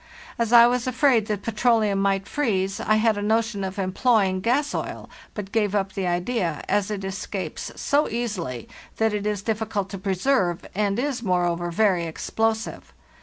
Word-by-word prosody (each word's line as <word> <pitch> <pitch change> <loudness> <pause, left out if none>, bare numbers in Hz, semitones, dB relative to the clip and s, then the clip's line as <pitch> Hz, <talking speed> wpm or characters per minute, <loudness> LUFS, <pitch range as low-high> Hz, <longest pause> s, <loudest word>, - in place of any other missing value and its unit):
As 230 -1 0
I 235 -1 +9
was 245 +1 +1
afraid 255 -4 +3
that 210 -2 -3
petroleum 220 -3 +2
might 195 0 +1
freeze, 195 -8 -1
I 215 - +2
had 215 -1 +2
a - - -3
notion 220 -1 0
of 190 +1 -4
employing 195 0 +2
gas 275 +8 +1
oil, - - -5 0.2
but 200 -2 -6
gave 210 -3 +1
up 195 -1 -1
the 190 -2 -2
idea, 175 -2 -1
as 205 -1 +1
it 205 -2 -4
escapes 195 0 -5
so 290 +1 +1
easily 195 - -3 0.3
that 220 -1 +2
it 210 0 -2
is 205 -2 -2
difficult 215 -3 -2
to 195 - -5
preserve, 190 -1 0
and 200 0 0
is, 265 -1 -1
moreover, 175 -4 0
very 180 -2 +2
explosive. 220 +7 -2
210 Hz, 170 wpm, -24 LUFS, 190-230 Hz, 0.3 s, I